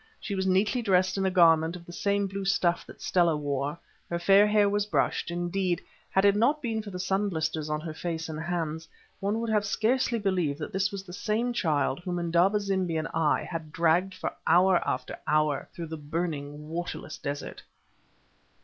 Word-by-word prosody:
She 205 - -5
was 190 -1 -1
neatly 200 +6 +2
dressed 185 -3 +2
in 195 -1 +1
a - - +3
garment 165 -2 +4
of 170 -1 -10
the 175 - -10
same 200 +2 0
blue 195 0 -4
stuff 175 -3 +1
that - - -12
Stella 170 -4 +3
wore, 145 +1 -2 0.3
her 170 - -1
fair 195 +4 +5
hair 210 -1 +4
was 205 +1 0
brushed; 150 -2 0
indeed, 175 +1 -1 0.3
had 190 +1 +2
it 200 0 +5
not 245 +8 +3
been 225 -5 -2
for 210 - -8
the 185 - -6
sun 195 +2 0
blisters 160 -2 -2
on 150 0 -1
her 160 -1 -6
face 165 0 -4
and 155 -1 -5
hands, 160 -1 -3 0.3
one 205 +3 -1
would 220 -2 +1
scarcely 235 +4 +1
have 215 - -7
believed 180 -8 0
that 150 - -6
this 195 +2 +1
was 200 -1 -5
the 175 -2 -11
same 225 +5 -1
child 150 - 0
whom 175 0 -4
Indaba 175 +4 +2
zimbi 190 -4 -1
and 155 - -2
I 155 -2 +2
had 165 -3 -6
dragged 170 +4 +2
for - - -4
hour 180 +1 +5
after - - -3
hour 150 -2 +1
through 170 - -6
the 160 - -5
burning, 150 -1 -4
waterless 165 -1 -5
desert. 145 0 -5
180 Hz, 195 wpm, -28 LUFS, 160-200 Hz, 0.3 s, fair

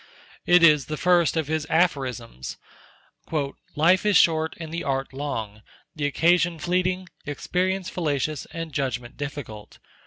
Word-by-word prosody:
It 175 0 +6
is 150 -5 +6
the 155 - -4
first 175 0 +3
of 160 -3 0
his 155 0 -2
"Aphorisms": 130 - -1 1.2
"Life 170 +5 +4
is 210 -2 +4
short, 160 -1 +3
and 160 -1 -7
the 170 - -3
Art 135 -1 -2
long; 115 -7 -4 0.3
the 145 -2 0
occasion 170 +3 +2
fleeting; 180 +2 0 0.2
experience 185 +5 -1
fallacious, 150 -3 -2
and 165 -2 -6
judgment 125 -3 -3
difficult. 140 -8 -7
155 Hz, 130 wpm, -25 LUFS, 135-175 Hz, 1.2 s, It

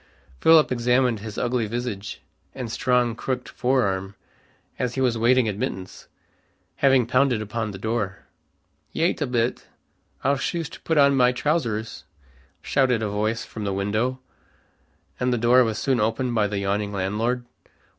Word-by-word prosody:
Philip 160 -3 +5
examined 125 -1 +2
his 110 0 -8
ugly 120 -2 0
visage 110 -3 -5 0.3
and 125 -4 -5
strong 125 -1 +1
crooked 125 +1 -3
fore 130 +1 +1
arm, 95 0 -2 0.6
as 125 -2 -1
he - - -2
was 125 -3 +2
waiting 120 +1 +3
admittance, 95 -2 -5 0.7
having 135 -3 +4
pounded 125 0 +2
upon 110 +1 -3
the 100 - -7
door. 105 -2 -3 0.7
"Yait 165 0 0
a 145 - +1
bit. 120 -1 -1 0.6
I'll 140 +1 +2
shoost 165 +4 -4
put 160 - 0
on 140 -1 +5
my 125 -1 +4
trowsers," 120 -6 -2 0.6
shouted 125 -5 +2
a 105 - -1
voice 110 +3 -1
from 110 - -7
the 100 -1 -1
window, 105 +7 -1 1.0
and 125 0 +1
the 120 - +1
door 120 +2 +5
was 110 -2 -2
soon 135 -3 +1
opened 115 +3 0
by 110 -3 +2
the 100 0 -3
yawning 100 +1 -1
landlord. 110 +6 -1
120 Hz, 150 wpm, -24 LUFS, 105-130 Hz, 1.0 s, Philip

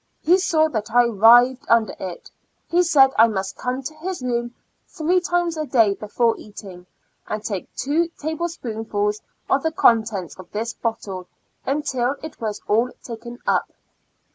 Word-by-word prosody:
He 360 +4 +5
saw 320 -4 +3
that 220 -6 -3
I 245 +1 +5
writhed 240 +3 +5
under 230 -3 +3
it. 185 -2 -7 0.4
He 350 +1 +3
said 285 -6 +5
I 225 - +8
must 195 -3 -3
come 255 +2 -3
to 310 - -6
his 350 -3 -5
room 240 -1 -2 0.3
three 345 +4 +1
times 350 -2 0
a 310 -1 -3
day 225 -7 +4
before 225 +3 0
eating, 190 -4 -11 0.4
and 215 0 -4
take 195 -4 -4
two 310 +6 0
table 320 +3 -3
spoonfuls 215 -7 -3 0.3
of 270 - +2
the 320 - 0
contents 220 - +2
of 185 - -11
this 225 +3 -3
bottle, 195 -5 -4 0.4
until 270 -2 0
it 315 -5 -9
was 215 -2 -4
all 230 +4 +2
taken 235 0 -8
up. - - +1
240 Hz, 160 wpm, -22 LUFS, 215-305 Hz, 0.4 s, I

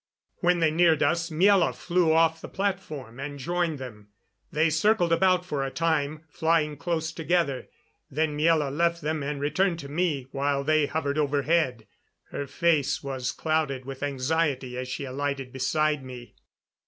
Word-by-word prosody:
When 180 -1 +2
they 160 -1 +4
neared 165 -1 +4
us 170 0 +1
Miela 185 +4 +4
flew 175 -2 +1
off 160 0 +3
the - - -8
platform 155 - -4
and 145 +1 -5
joined 170 +2 -1
them. 110 -6 -9 0.4
They 155 +2 +2
circled 175 +1 +3
about 180 +1 +3
for 145 -6 -2
a 135 - -2
time, 155 -1 -1
flying 160 -1 +1
close 160 +1 -2
together, 160 -4 0 0.4
then 150 +1 -1
Miela 150 -2 +2
left 170 0 +1
them 155 0 -1
and 140 0 -3
returned 170 +5 +1
to 140 - -9
me, 150 -4 -1
while 140 0 0
they 155 0 +2
hovered 145 0 -1
overhead. 145 -4 +1 0.5
Her 140 - -4
face 155 -4 +1
was 130 -2 -3
clouded 155 -5 -1
with 135 0 -7
anxiety 140 -2 -1
as 125 0 -4
she 135 - -4
alighted 135 -1 -3
beside 150 +2 0
me. 125 -2 -10
155 Hz, 155 wpm, -26 LUFS, 140-165 Hz, 0.5 s, they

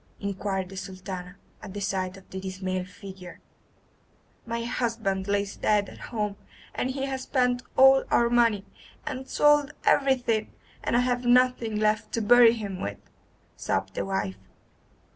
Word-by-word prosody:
inquired 195 -1 -3
the 195 - -10
Sultana, 185 -1 -7 0.3
at 200 -2 -9
the - - -3
sight 190 -1 -2
of 190 - -16
the 190 - -5
dismal 185 -1 -3
figure. 185 -1 -11 1.1
"My 230 0 -2
husband 225 -5 -1
lies 200 0 0
dead 205 -2 +2
at - - -13
home, 210 -3 -2 0.4
and 255 - -1
he 270 +1 -2
has 265 -1 -3
spent 250 -2 +1 0.2
all 265 0 +7
our 235 - +4
money, 230 -4 +3 0.4
and 265 -3 -5
sold 295 -1 +3
everything, 245 -6 +2 0.3
and 235 - +1
I - - +4
have 245 0 0
nothing 245 -2 +3
left 215 +1 0
to 230 - 0
bury 240 +1 +7
him 200 -5 -5
with," 100 0 -4 0.6
sobbed 95 0 -2
the - - -2
wife. 190 - -3
210 Hz, 150 wpm, -27 LUFS, 190-245 Hz, 1.1 s, all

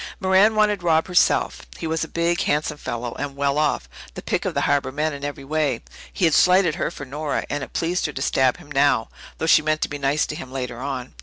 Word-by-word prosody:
Merran 195 +2 +4
wanted 210 -2 +2
Rob 160 -2 +2
herself. 180 -1 +2 0.2
He - - -6
was 160 0 -1
a - - -4
big, 170 +1 0
handsome 150 0 -1
fellow, 120 0 -4
and 140 -1 -4
well 140 +1 0
off 150 - 0 0.3
the - - -7
pick - - -1
of - - -2
the - - +1
harbour 140 -2 +1
men 150 +2 -1
in 140 0 -8
every 145 -1 -5
way. 145 -4 -1 0.3
He 185 - 0
had 160 - +3
slighted 180 -1 +5
her 175 - -2
for 145 - -8
Nora, 145 +2 -3
and 145 -1 -2
it - - -9
pleased 170 +1 0
her 150 - -7
to 135 - -5
stab 130 -2 +2
him 165 -5 -16
now, 140 -5 +2 0.3
though - - -2
she 160 - +6
meant 155 0 0
to - - 0
be 145 - -5
nice 140 +2 +1
to - - -6
him 130 -3 -8
later 125 -3 -5
on. 130 -1 -5
150 Hz, 245 wpm, -22 LUFS, 140-165 Hz, 0.3 s, she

